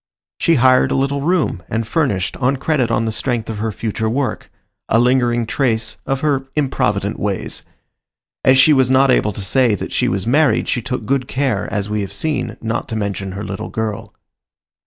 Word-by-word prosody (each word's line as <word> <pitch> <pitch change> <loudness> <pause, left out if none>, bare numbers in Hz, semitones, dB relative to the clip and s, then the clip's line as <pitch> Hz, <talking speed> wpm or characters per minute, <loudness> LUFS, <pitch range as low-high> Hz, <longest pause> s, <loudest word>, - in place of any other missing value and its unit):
She 165 - +3
hired 130 -1 +4
a - - 0
little 140 +1 0
room 160 - 0
and 115 0 -2
furnished 115 - 0
on 135 +1 +1
credit 135 -4 0
on 115 -1 +1
the 110 - -1
strength 115 0 -2
of 105 - -6
her 110 +1 -1
future 110 +1 -2
work—a 130 -2 -3
lingering 120 -1 +2
trace 110 -3 -1
of 135 0 -1
her 140 -3 0
improvident 110 -8 0
ways. 100 -2 -3 0.8
As 130 0 +5
she 150 +4 +6
was 130 -2 +3
not 130 0 +4
able 105 -4 +2
to 100 - -7
say 120 +1 +3
that - - -6
she - - +1
was 95 0 -1
married 145 +6 +2
she 120 - 0
took 125 +2 -4
good 135 -2 0
care, 130 -7 -1
as 100 0 -2
we 105 0 -2
have 100 - -5
seen, 150 -5 -2
not 115 +1 -3
to 110 - -3
mention 100 -2 -3
her 100 +2 -5
little 95 -1 -5
girl. 110 -2 -4
120 Hz, 190 wpm, -18 LUFS, 105-135 Hz, 0.8 s, she